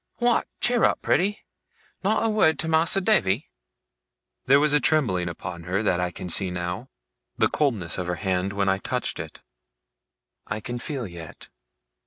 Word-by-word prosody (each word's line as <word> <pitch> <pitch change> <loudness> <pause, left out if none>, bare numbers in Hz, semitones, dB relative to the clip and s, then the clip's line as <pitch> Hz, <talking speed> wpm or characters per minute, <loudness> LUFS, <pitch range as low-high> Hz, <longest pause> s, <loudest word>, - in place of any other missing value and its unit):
What, 240 -1 +2
cheer 240 -1 +2
up, - - +2
pretty! 205 +4 +1 0.6
Not 215 +3 +1
a - - +3
wured 210 -7 +3
to 160 - -2
Mas'r 165 +4 +3
Davy?' 155 - +2 1.0
There 140 +2 +6
was 150 0 +3
a 150 - +5
trembling 105 - +1
upon 85 0 -7
her, 95 +4 -1
that 90 -4 +1
I 90 0 0
can 90 - -8
see 95 +2 +2
now. 90 +7 -4 0.5
The - - +3
coldness 110 - 0
of 90 - -3
her 90 - -1
hand 95 +1 -1
when 100 -1 -1
I 95 0 +2
touched - - -3
it, - - -8 1.1
I 105 - -3
can 120 +3 -5
feel 135 -2 -4
yet. 85 -4 -10
105 Hz, 170 wpm, -25 LUFS, -, 1.1 s, There